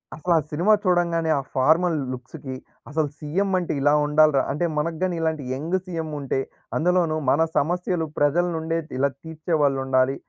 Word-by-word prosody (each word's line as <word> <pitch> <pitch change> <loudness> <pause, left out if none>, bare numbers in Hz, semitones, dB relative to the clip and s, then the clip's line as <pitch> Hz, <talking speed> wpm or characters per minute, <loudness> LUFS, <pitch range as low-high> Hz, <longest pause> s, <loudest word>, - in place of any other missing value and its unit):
అసలు 170 +3 0
ఆ - - +4
సినిమా 175 +8 +3
చూడంగానే, 170 -3 +1
ఆ - - -2
ఫార్మల్ 160 +6 +3 0.2
లుక్స్‌కి 130 +2 -7 0.4
అసలు 155 0 0
సీఎం 180 +7 -1
అంటే 175 - -3
ఇలా 145 +1 +4
ఉండాల‌రా! 150 -2 +4
అంటే 150 +5 -1
మనకు 160 +2 -1
గాని, 185 -2 0
ఇలాంటి 160 -3 -1
యంగ్ 155 +7 -2
సీఎం 165 -3 -4
ఉంటే, 135 -1 -1 0.4
అందులోనూ 175 -1 +2 0.2
మన 145 - +3 0.2
సమస్యలు 175 +2 0
ప్రజల 150 +5 +3
నుండే 160 +1 -2 0.2
ఇలా 140 +1 +2
తీర్చేవాళ్ళుండాలి. 140 -5 +1
160 Hz, 150 wpm, -24 LUFS, 145-175 Hz, 0.4 s, ఆ